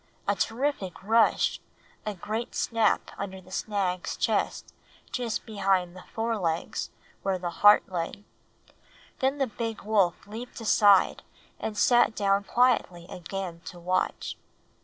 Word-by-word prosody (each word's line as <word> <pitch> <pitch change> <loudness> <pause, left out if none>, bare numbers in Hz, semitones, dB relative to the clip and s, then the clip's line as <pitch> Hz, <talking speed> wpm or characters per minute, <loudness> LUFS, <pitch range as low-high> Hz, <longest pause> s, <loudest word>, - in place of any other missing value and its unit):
A 200 - +4
terrific 225 -4 -2
rush, 225 +2 +3 0.5
a 210 - -2
quick 215 +6 -4
snap 225 -3 +1
under 190 -1 -5
the 185 0 -17
stag's 190 -3 -2
chest - - -1 0.4
just 240 -3 -2
behind 195 -4 0
the 185 - -11
fore 225 0 -1
legs, 165 -2 -2 0.3
where 195 -1 0
the 175 -1 -4
heart 205 0 +7
lay; 180 +2 -4 1.0
then 270 +1 +1
the 275 - +2
big 225 -1 -5
wolf 200 -5 +2
leaped 225 +5 -8
aside 205 -3 +5 0.4
and 215 -1 -4
sat 240 -1 +4
down 200 0 +2
quietly 235 -9 +2
again 180 -1 -5
to 180 - -8
watch. 185 +2 -1
205 Hz, 130 wpm, -27 LUFS, 185-225 Hz, 1.0 s, heart